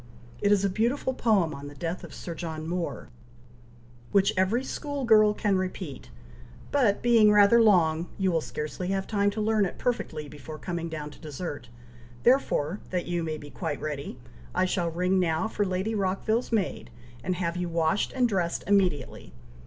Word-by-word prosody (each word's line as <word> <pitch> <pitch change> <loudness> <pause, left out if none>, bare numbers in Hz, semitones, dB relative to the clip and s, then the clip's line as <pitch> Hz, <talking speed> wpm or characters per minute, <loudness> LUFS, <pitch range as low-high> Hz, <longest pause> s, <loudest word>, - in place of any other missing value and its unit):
It 205 - +3
is 200 -1 +4
a - - +4
beautiful 240 +6 0
poem 205 -10 +2
on 140 +1 -8
the 145 - -10
death 165 +5 -4
of - - -9
Sir 170 - -6
John 160 -1 -5
Moore, 175 -4 -3 1.0
which 200 -1 +3
every 190 +7 +2
school 285 -1 -4
girl 215 -2 +6
can 200 -3 +1
repeat, 185 -6 -5 0.6
but 245 -8 +2
being 230 -3 +6
rather 210 +3 +6
long, 170 -6 +4
you 190 -2 +1
will 165 -2 +1
scarcely 155 +4 -5
have 195 0 -1
time 205 -1 +1
to 205 +2 -5
learn 215 0 +2
it 190 - -3
perfectly, 210 -11 -2
before 150 +1 -9
coming 170 0 -4
down 150 -2 -5
to - - -15
dessert, 150 -4 -6 0.5
therefore, 210 - +2
that 180 -1 -2
you 175 -1 -1
may 160 -1 -3
be 145 -1 -11
quite 145 - -4
ready, 150 -2 -5 0.4
I 185 - +3
shall 180 -2 0
ring 180 +3 +1
now 165 +1 +1
for 210 -2 -1
Lady 190 +4 -1
Rockville's 210 +4 0
maid, 190 - -1 0.3
and 185 - -1
have 170 -1 -2
you 180 -1 -2
washed 165 +3 +1
and 255 -2 +3
dressed 180 -6 -1
immediately. 180 - 0
185 Hz, 175 wpm, -27 LUFS, 160-210 Hz, 1.0 s, girl